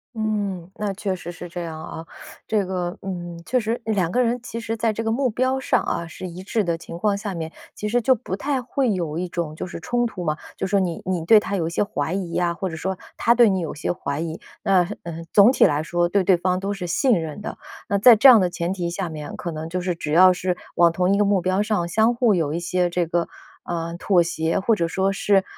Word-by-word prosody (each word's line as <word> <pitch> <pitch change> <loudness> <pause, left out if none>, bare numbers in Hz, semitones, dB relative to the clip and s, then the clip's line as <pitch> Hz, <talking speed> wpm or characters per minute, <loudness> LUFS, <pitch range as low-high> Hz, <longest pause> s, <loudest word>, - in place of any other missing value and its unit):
嗯， 205 -5 -2
那 210 -2 -2
确 195 -1 -2
实 175 -1 -7
是 175 +1 -9
这 175 +1 -5
样 160 -2 -6
啊。 160 - -7 0.4
这 210 -3 +1
个， 180 -1 -3
嗯， 175 -3 -6
确 255 - +1
实 230 +1 -2
两 195 -6 0
个 250 +6 +2
人 240 +1 0
其 230 -1 -6
实 225 -1 -3
在 225 0 +1
这 220 +1 -4
个 225 - 0
目 255 +3 +1
标 255 +4 0
上 265 - +1
啊， 170 - -2
是 165 - -8
一 175 +1 -8
致 215 +2 0
的 170 -3 -1
情 170 0 -9
况 205 +3 +1
下 200 -1 -4
面， 160 -1 -5 0.2
其 210 - -4
实 240 +3 +1
就 260 +2 +4
不 190 -5 -5
太 270 +5 -1
会 255 0 0
有 165 -4 -3
一 180 - -2
种 170 -3 -3
就 160 - -5
是 170 - -7
冲 240 +9 0
突 185 -5 -7
嘛， 155 -2 -1 0.2
就 - - -3
说 195 +1 +2
你 175 -3 -2
你 180 -3 -1
对 215 +5 +7
他 200 -1 -3
有 170 -4 -1
一 - - -2
些 170 - 0
怀 160 -6 -3
疑 185 -3 -3
啊， 175 -1 +1
或 185 +2 -3
者 165 - -6
说 190 +3 -3 0.2
他 235 - +3
对 240 -2 +6
你 190 -1 +1
有 165 -3 -4
一 - - -13
些 - - -1
怀 140 -5 -4
疑， 165 0 -4 0.2
那， 185 -3 +3 0.2
嗯， 165 -1 -7
总 205 +4 +7
体 - - +5
来 150 0 +1
说 175 +1 0
对 200 +1 +2
对 185 0 +5
方 180 +1 0
都 200 +1 -2
是 190 -3 -5
信 245 +9 +2
任 160 +3 -6
的。 - - -6 0.3
那 200 - +1
在 235 +3 +9
这 220 +6 +6
样 240 -4 +9
的 180 - +2
前 175 +1 -2
提 175 -3 -3
下 175 0 -3
面， 155 -2 -7
可 170 - -5
能 160 0 -6
就 180 +2 -2
是 180 0 -1
只 155 -3 -4
要 185 +2 +7
是 180 0 -2 0.2
往 170 -1 +5
同 180 +3 +1
一 - - +2
个 205 - +3
目 200 -2 +2
标 185 +2 +1
上， 210 -5 0
相 220 +7 +2
互 235 -3 +3
有 160 -5 0
一 170 - -1
些 175 +1 0
这 175 0 0
个， 170 +1 -1 0.4
呃， 170 -1 -3
妥 180 -3 +3
协， 165 0 -1
或 215 +4 +2
者 170 -4 0
说 190 +3 0
是， 195 0 +2
185 Hz, 285 characters per minute, -23 LUFS, 170-210 Hz, 0.4 s, 在